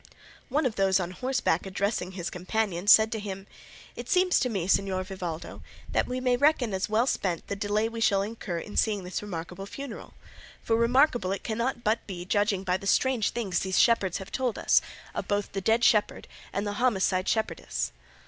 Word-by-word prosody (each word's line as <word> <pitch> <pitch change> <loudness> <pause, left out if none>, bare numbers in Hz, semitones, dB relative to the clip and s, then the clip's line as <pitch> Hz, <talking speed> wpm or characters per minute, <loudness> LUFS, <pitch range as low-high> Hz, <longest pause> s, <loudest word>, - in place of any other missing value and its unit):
One 290 +3 +1
of 235 -4 -1
those 195 -1 +3
on 175 -1 -3
horseback 250 -5 0
addressing 190 -1 -2
his 180 -2 -4
companion 185 0 -2
said 220 +1 +7
to 220 - -2
him, 195 -2 -6 0.5
"It - - -8
seems 365 0 +4
to 250 - 0
me, 190 -6 -2
Señor 190 -1 +1
Vivaldo, 180 -4 -6 0.3
that - - +1
we 250 +1 -3
may 250 -1 +2
reckon 270 -6 +2
as 190 +2 -1
well 220 +3 +3
spent 185 -9 -1
the 200 - -4
delay 205 +2 0
we 230 0 -6
shall 195 -3 +3
incur 205 -4 -5
in 205 +5 -7
seeing 210 -3 +1
this 180 +1 -4
remarkable 185 0 -6
funeral, 275 0 -8 0.5
for 225 - +1
remarkable 235 -3 +3
it 195 - -3
cannot 235 +2 -2
but 220 +2 0
be 180 -3 -6
judging 205 0 +1
by 185 -1 +1
the 195 - -7
strange 250 +1 +2
things 200 -7 -1
these 190 -1 -1
shepherds 205 -7 +3
have 190 - -9
told 255 -4 -1
us, - - +4 0.3
of - - -4
both 205 -1 -1
the 195 - -3
dead 225 +4 +2
shepherd 210 -4 +2 0.2
and 205 +1 -2
homicide 205 -4 +1
shepherdess." 65 - -2
205 Hz, 190 wpm, -27 LUFS, 190-230 Hz, 0.5 s, said